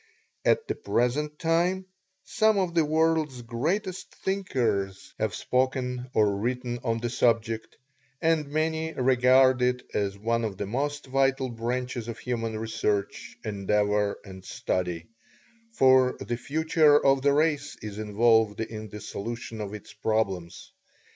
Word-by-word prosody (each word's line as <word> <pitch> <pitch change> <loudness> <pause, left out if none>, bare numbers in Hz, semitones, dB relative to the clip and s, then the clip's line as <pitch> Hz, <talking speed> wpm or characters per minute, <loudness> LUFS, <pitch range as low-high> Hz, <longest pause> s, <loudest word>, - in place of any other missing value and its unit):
At 455 - +2
the - - 0
present 150 - -1
time 175 +4 +1 0.4
some 215 -1 +2
of 185 -3 0
the 165 -2 +4
world's 155 -4 +1
greatest 180 - -3
thinkers 115 - -2
have - - -1
spoken 125 -1 -1
or 105 -2 +3
written 120 +1 -2
on 115 -2 0
the 120 +1 -2
subject, 115 -2 0 0.4
and 160 -2 +2
many 160 +2 -1
regard 130 0 +4
it 125 0 +1
as 100 -1 -1
one 115 +3 0
of 105 -4 -3
the 100 - -3
most 145 +7 -2
vital 135 0 +1
branches 120 0 -3
of 115 -1 -5
human 115 -2 -3
research, 110 -2 -2
endeavor, 105 0 +1
and 95 -2 -10
study, 90 -2 -2 0.7
for 130 - +4
the 120 - -3
future 155 +3 +3
of 135 -1 +4
the 140 +1 +4
race 145 -1 +1
is 105 -1 -6
involved 110 0 +3
in 110 -1 -5
the 105 +2 -8
solution 115 +2 -6
of 100 -1 -5
its 105 0 -11
problems. 100 -5 -2
125 Hz, 135 wpm, -27 LUFS, 110-145 Hz, 0.7 s, the